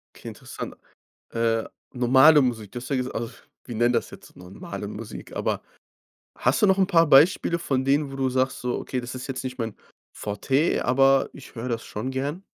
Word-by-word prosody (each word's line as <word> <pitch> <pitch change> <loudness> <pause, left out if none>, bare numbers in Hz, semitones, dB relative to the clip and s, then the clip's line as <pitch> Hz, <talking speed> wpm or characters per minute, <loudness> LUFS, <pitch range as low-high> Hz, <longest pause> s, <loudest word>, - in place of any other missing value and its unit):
Okay, - - -12
interessant. - - -8 0.6
Äh, 115 -1 0 0.3
normale 130 +5 +6
Musik, 115 -6 -1
du 120 - -5
hast 125 - -8
ja 135 - +1
gesag 125 0 -3
au - - -2
f 120 - -16 0.2
wir 120 - -7
nennen 120 +2 +3
das 115 - -1
jetzt - - -14
normale 90 +1 -8
Musik, - - -8
aber - - -1 0.8
hast 125 - +1
du - - +6
noch 190 0 +4
'n 190 - +4
paar 165 -4 +4
Beispiele 170 +4 +5
von 130 -4 -1
denen, 140 0 +2
wo - - -7
du 130 -1 +1
sagst: 130 0 -1
„Okay, 125 +1 -2
das 120 +1 -6
ist 130 - -6
jetzt 135 0 -4
nicht 130 0 -5
mein 115 -3 -3 0.4
Forté, 135 - 0
aber 135 +2 +3
ich - - -13
höre 120 +2 -4
das 115 -1 -2
schon 125 +6 -5
gerne.“? 145 +8 -3
130 Hz, 200 wpm, -25 LUFS, 120-140 Hz, 0.8 s, normale